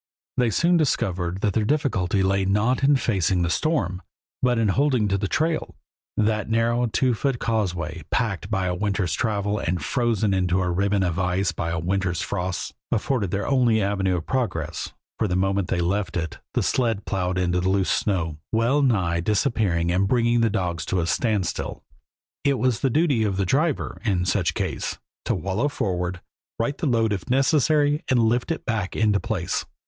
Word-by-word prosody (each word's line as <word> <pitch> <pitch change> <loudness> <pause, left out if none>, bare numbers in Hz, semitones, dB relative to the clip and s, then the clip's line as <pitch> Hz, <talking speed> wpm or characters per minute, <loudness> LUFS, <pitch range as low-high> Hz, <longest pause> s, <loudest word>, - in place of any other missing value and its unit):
They 125 -2 +2
soon 170 - +3
discovered 95 - 0
that 105 -3 +1
their 110 - +1
difficulty 105 -8 +1
lay 95 +1 +2
not 105 +7 +1
in 140 +1 +5
facing 95 -8 +1
the 85 - 0
storm, 110 - 0 0.4
but 125 -1 +2
in 110 -2 +2
holding 125 0 +2
to 100 - +1
the 100 - -1
trail. 160 +7 -1 0.4
That 110 0 +1
narrow, 115 +2 +2
two 125 +3 +1
foot 135 +3 -1
causeway, 90 -9 -2
packed 110 -7 -1
by 95 -4 0
a 90 - 0
winter's 100 -3 -1
travel 105 0 -1
and 90 +2 -1
frozen 115 -3 +1
into 90 -1 +1
a 90 -1 0
ribbon 100 +2 +1
of 90 0 -1
ice 90 +1 +1
by 85 - -3
a 85 - -2
winter's 90 +1 -1
frosts, 95 -2 -3 0.2
afforded 120 -9 0
their 100 +2 -2
only 125 -5 +3
avenue 95 -2 0
of 85 - -5
progress, 125 - -2 0.3
for 110 - +2
the 90 - -1
moment 95 0 +1
they 85 - 0
left 90 0 -1
it 80 -3 -4 0.2
the - - +2
sled 115 -5 0
plowed 90 -2 -1
into 90 -1 +1
the 95 - +1
loose 95 -1 +1
snow, 85 -7 -1
well 115 +6 +2
nigh 95 -11 +2
disappearing 100 - +1
and 95 +2 +2
bringing 120 +1 +2
the 115 - +3
dogs 90 -6 -2
to 95 - 0
a 85 - 0
standstill. 105 0 -1 0.6
It 140 -1 +2
was 125 -1 +1
the 135 - +1
duty 140 -4 +2
of 100 -3 -1
the 100 - +1
driver, 150 - 0
in 95 -6 +1
such 90 -3 +1
case, - - -3 0.3
to - - +1
wallow 100 +8 -1
forward, 90 -9 -2 0.4
right 125 +5 -1
the 155 - -2
load 115 -4 +2
if 95 -5 -5
necessary, 145 +3 +3
and 130 - +2
lift 120 +3 +2
it 165 - -3
back 110 -6 -2
into 105 -2 +2
place. 95 -6 -2
100 Hz, 185 wpm, -24 LUFS, 90-120 Hz, 0.6 s, in